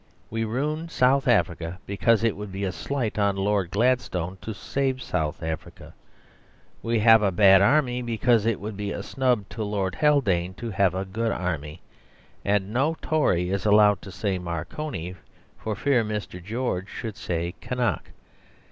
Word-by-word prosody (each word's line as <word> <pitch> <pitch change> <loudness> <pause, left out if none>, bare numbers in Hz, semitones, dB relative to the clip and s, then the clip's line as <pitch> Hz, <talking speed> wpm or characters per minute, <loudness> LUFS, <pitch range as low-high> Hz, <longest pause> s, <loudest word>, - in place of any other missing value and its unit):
We 115 0 -1
ruin 150 +8 -2
South 135 -1 +3
Africa 85 -7 +1
because 110 +3 +2
it 115 -3 +2
would 105 -1 -7
be 95 +1 -4
a 95 - 0
slight 115 +5 -3
on 100 -1 +2
Lord 100 -2 0
Gladstone 95 -5 0
to 110 - -5
save 130 +4 -2
South 80 -10 -2
Africa. 80 0 -6 0.9
We 115 0 0
have 110 0 +6
a 100 -2 +2
bad 95 +1 +6
army, 125 +2 +3
because 115 -1 +2
it 115 - +1
would 105 +1 -6
be 100 0 -3
a - - -4
snub 125 -7 0
to 110 - -4
Lord 100 -3 -1
Haldane 95 - +2
to 115 +3 -5
have 95 -2 +2
a 95 +1 -2
good 115 +4 -2
army. 80 -5 -4 0.6
And 100 0 0
no 145 +6 +1
Tory 90 - +1
is 100 -1 -1
allowed 105 -2 +5
to 95 - -10
say 95 -1 -2
"Marconi" 90 - -5 0.5
for 110 -1 -3
fear 130 +1 +2
Mr. 105 -4 -5
George 105 -2 -3
should 110 -3 -6
say 85 -5 -3
"Kynoch." 125 -1 -2
105 Hz, 165 wpm, -25 LUFS, 95-120 Hz, 0.9 s, have